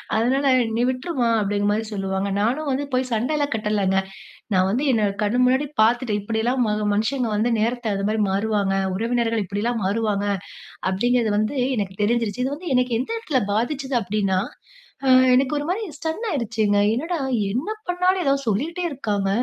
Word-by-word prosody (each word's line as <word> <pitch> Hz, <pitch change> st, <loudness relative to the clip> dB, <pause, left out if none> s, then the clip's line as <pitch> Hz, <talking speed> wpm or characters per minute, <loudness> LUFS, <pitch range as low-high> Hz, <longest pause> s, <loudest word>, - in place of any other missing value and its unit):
அதனால 260 Hz, +5 st, +2 dB, 0.3 s
நீ 235 Hz, -, +1 dB
விட்ருமா, 255 Hz, 0 st, -1 dB
அப்டிங்கிற 205 Hz, 0 st, 0 dB
மாரி 215 Hz, +2 st, 0 dB
சொல்லுவாங்க. 195 Hz, 0 st, -2 dB
நானும் 270 Hz, +8 st, 0 dB
வந்து 270 Hz, +2 st, -1 dB
போய் 255 Hz, 0 st, 0 dB
சண்டைலாம் 285 Hz, +5 st, 0 dB
கட்டலங்க. 210 Hz, -3 st, 0 dB, 0.6 s
நான் 185 Hz, 0 st, +3 dB
வந்து 240 Hz, +7 st, 0 dB
என்னோட 215 Hz, -3 st, +2 dB
கண்ணு 210 Hz, +4 st, +1 dB
முன்னாடி 260 Hz, +3 st, +2 dB, 0.2 s
பார்த்துட்டேன். 225 Hz, -2 st, +2 dB
இப்படிலாம் 230 Hz, +4 st, 0 dB
ம -, -, +1 dB, 0.2 s
மனுஷங்க 235 Hz, +4 st, 0 dB
வந்து 230 Hz, +3 st, +1 dB
நேரத்த 230 Hz, -1 st, -1 dB
அது 195 Hz, -, -3 dB
மாரி 220 Hz, 0 st, 0 dB
மாறுவாங்க, 200 Hz, -1 st, 0 dB, 0.2 s
உறவினர்கள் 230 Hz, 0 st, 0 dB
இப்டிலாம் 215 Hz, +4 st, -2 dB
மாறுவாங்க, 205 Hz, 0 st, 0 dB, 0.7 s
அப்டிங்கிறது 235 Hz, +2 st, +1 dB
வந்து 215 Hz, +6 st, 0 dB, 0.2 s
எனக்கு 195 Hz, -2 st, -2 dB
தெரிஞ்சிருச்சு. 230 Hz, 0 st, 0 dB
இது 270 Hz, -, -1 dB
வந்து 340 Hz, 0 st, -6 dB
எனக்கு 250 Hz, -2 st, +2 dB
எந்த 265 Hz, -, -3 dB
எடத்துல 295 Hz, -, 0 dB
பாதிச்சுது 265 Hz, +4 st, -1 dB
அப்டின்னா, 195 Hz, -1 st, 0 dB, 0.7 s
அ -, -, +1 dB, 0.3 s
எனக்கு 260 Hz, +2 st, +3 dB
ஒரு 290 Hz, -, -2 dB
மாதிரி 390 Hz, +5 st, -1 dB, 0.2 s
ஸ்டன் 320 Hz, +9 st, -4 dB
ஆயிடுச்சுங்க. 225 Hz, -, 0 dB, 0.2 s
என்னடா, 330 Hz, +8 st, -2 dB, 0.3 s
என்ன 255 Hz, -, -2 dB, 0.2 s
பண்ணாலும் 360 Hz, +1 st, +2 dB
ஏதாவது 275 Hz, -1 st, +1 dB
சொல்லிக்கிட்டே 305 Hz, -, -1 dB
இருக்காங்க! 210 Hz, -9 st, -2 dB
230 Hz, 160 wpm, -22 LUFS, 205-270 Hz, 0.7 s, நான்